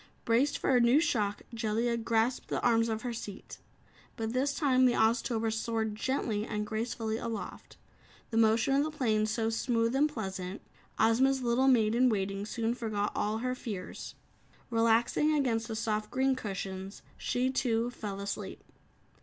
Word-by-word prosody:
Braced 245 +5 +2
for 260 - +1
a - - +6
new 240 +5 +5
shock, 220 -11 0
Jellia 230 +1 0
grasped 230 +2 0
the - - -1
arms 230 -1 +3
of 220 0 -3
her 245 -1 -3
seat. 205 -3 -8 0.6
But 225 0 -3
this 275 +3 0
time 260 -4 +3
the 245 - +3
Oztober 225 0 +1
soared 220 -1 -1
gently 215 -2 -1
and 210 -1 -3
gracefully 220 0 -2
aloft, 230 -3 -6 0.5
the 225 - -1
motion 225 +4 +3
of 280 +1 +3
the 310 - -2
plane 220 -8 +1
so 225 +1 0
smooth 230 +1 0
and 295 +3 +3
pleasant, 190 -6 -5 0.3
Ozma's 260 +4 +3
little 245 +2 +2
Maid 225 -5 +4
in 250 +2 +4
Waiting 200 -1 -2
soon 230 +1 -1
forgot 215 -4 -2
all 210 +1 0
her 255 - 0
fears. 205 -7 -6 0.6
Relaxing 230 +6 +3
against 230 -6 0
the 225 - -4
soft 215 -1 -1
green 265 0 +1
cushions, 195 -3 -6
she, 255 +1 -1
too, 240 -2 0
fell 205 -4 -6
asleep. 200 0 -5
230 Hz, 160 wpm, -30 LUFS, 215-250 Hz, 0.6 s, a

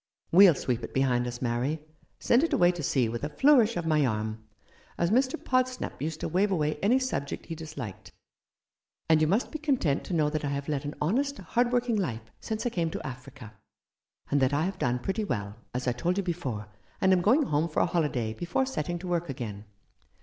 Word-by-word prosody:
We'll 180 -2 +8
sweep 125 -3 -2
it - - -7
behind 125 -2 +2
us, 120 +1 -5
Mary 125 +6 -1 0.2
— - - -36
send 240 +5 +5
it 330 - 0
away 175 0 +5
to 175 -2 -6
sea 130 -4 +1
with 115 +3 -4
a 150 - -1
flourish 240 - +4
of 170 - -2
my 155 -2 +3
arm 110 -2 -2 0.3
— - - -29
as 170 +2 +1
Mr. 260 +5 +3
Podsnap 255 - -1
used 155 +1 -3
to - - -1
wave 190 +5 +2
away 155 -5 0
any 225 +6 +4
subject 255 - -3
he 165 - -5
disliked; 155 - -8 1.0
and 160 -1 +4
you 155 - +4
must 205 +9 +1
be 310 - -5
content 255 - +1
to 180 - -3
know 155 -2 +3
that 155 -1 -2
I - - -1
have 140 0 -3
led 145 -2 -2
an 145 - -4
honest, 270 - 0
hard 245 0 0
working 245 -2 +1
life 115 - -3
since 220 +1 -4
I 245 - 0
came 170 -4 0
to - - -6
Africa, 125 -3 -9 0.8
and 145 - +3
that 130 +1 +2
I 145 +2 +2
have 190 +1 -4
done 125 0 +1
pretty 195 - -2
well 105 - -3
— - - -40
as 125 0 -2
I - - +3
told 175 +10 -1
you 200 - +1
before 140 - -3 0.2
— - - -33
and 190 0 +4
am 180 - +3
going 250 - +4
home 155 - 0
for 155 - 0
a - - +4
holiday 130 -10 -1
before 175 - -1
setting 175 - -3
to 180 +2 -8
work 175 -2 -1
again." 110 -6 -6
160 Hz, 230 wpm, -28 LUFS, 130-200 Hz, 1.0 s, We'll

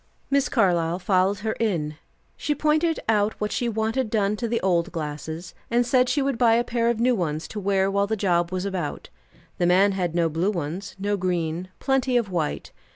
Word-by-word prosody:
Miss 280 -1 +2
Carlyle 175 -7 +2
followed 190 +1 +1
her 220 - +1
in. 160 -9 -1 0.4
She 295 - -1
pointed 310 +3 +1
out 210 -1 +1
what 210 0 -2
she 240 - -1
wanted 225 +2 -1
done 210 -1 +1
to 235 - -2
the 230 +1 0
old 175 -1 +1
glasses, 160 +1 -5 0.2
and 240 +1 +2
said 250 0 +3
she 275 +2 +1
would 270 -4 -1
buy 230 -2 +5
a 235 - +2
pair 235 -1 0
of 235 -2 0
new 250 +2 +3
ones 160 -6 -2
to 215 - -5
wear 195 -1 +1
while 200 0 +1
the 220 - 0
job 175 -4 +1
was 185 +1 -2
about. 185 -6 -4 0.5
The 175 - +3
man 190 +3 +5
had 180 -3 -2
no 170 -1 +3
blue 165 +5 0
ones, 180 +1 -4
no 205 +1 -1
green; 175 -1 -2
plenty 265 -2 +1
of 220 -5 -1
white. 165 -4 -2
200 Hz, 205 wpm, -24 LUFS, 175-235 Hz, 0.5 s, buy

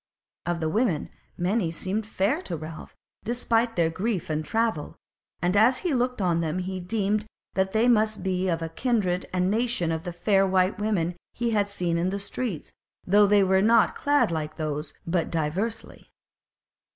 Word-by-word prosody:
Of 175 -1 0
the 160 - -1
women 205 -5 0 0.3
many 185 +1 +1
seemed 195 +6 -3
fair 225 - 0
to 175 - -4
Ralph 155 +1 -9 0.3
despite 235 0 +1
their 165 -2 +2
grief 185 -2 -2
and 155 0 -1
travel; 220 -2 -1 0.5
and 180 +2 +2
as 230 +5 +5
he 340 - +1
looked 250 -1 0
on 170 -2 +2
them 160 +1 -1
he 185 +1 -3
deemed 210 +3 -1 0.3
that 190 0 +1
they 225 +3 +3
must 215 -4 +2
be 185 -1 0
of 165 -1 0
the 165 - -3
kindred 190 -2 0
and 185 +1 +1
nation 225 -6 0
of 160 -1 -2
the 175 - -4
fair 195 +3 +2
white 185 +1 +2
women 185 -5 0 0.2
he 235 -1 -1
had 205 -2 +1
seen 175 -4 -1
in 175 +2 +1
the 195 - -2
streets; 200 - -4 0.3
though 205 +2 +5
they 205 0 +5
were 190 0 +3
not 225 +2 +4
clad 290 -9 +2
like 155 -1 -3
those, 155 -1 -4
but 170 -1 0
diversely. 185 +8 -3
190 Hz, 175 wpm, -26 LUFS, 170-220 Hz, 0.5 s, as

